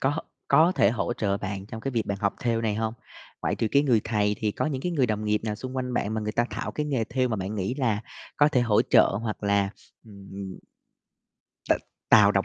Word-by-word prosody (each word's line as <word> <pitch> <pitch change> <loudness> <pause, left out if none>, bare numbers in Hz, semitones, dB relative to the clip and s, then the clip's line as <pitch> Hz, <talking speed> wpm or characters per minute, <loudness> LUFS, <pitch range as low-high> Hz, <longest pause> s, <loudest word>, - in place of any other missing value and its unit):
có 140 +3 +1 0.3
có 160 +6 +5
thể 100 - +4
hỗ 120 +1 -1
trợ 100 -4 0
bạn 100 -1 -5
trong 110 +1 -7
cái 135 - -3
việc 115 -3 -1
bạn 100 -1 -2
học 100 -1 +1
thêu 115 -2 +1
này 110 -2 0
hông? 110 +1 -2 0.5
Ngoại - - 0
trừ 115 - -1
cái 140 - +5
người 125 -6 +3
thầy 105 -2 +1
thì 110 - 0
có - - -1
những 135 -4 -2
cái 180 - -1
người 140 -6 +2
đồng 110 -1 -2
nghiệp 105 0 +1
nào 105 -2 -1
xung 130 +4 -7
quanh 125 -1 -2
bạn 105 -1 -1
mà 110 - -1
người 105 0 -3
ta 120 - +2
thạo - - -4
cái 150 - -2
nghề 130 -6 0
thêu 125 +2 0
mà 110 - -1
bạn 100 +2 -4
nghĩ 100 +4 -2
là 115 -7 0 0.3
có 145 - +5
thể 135 -5 +2
hỗ 115 -4 +3
trợ - - +5
hoặc 110 -2 -4
là, 100 -1 +2 0.3
ừm 100 -2 -9 1.1
t - - +6 0.4
tạo 105 -2 +7
động 100 -1 +2
110 Hz, 245 wpm, -26 LUFS, 105-125 Hz, 1.1 s, tạo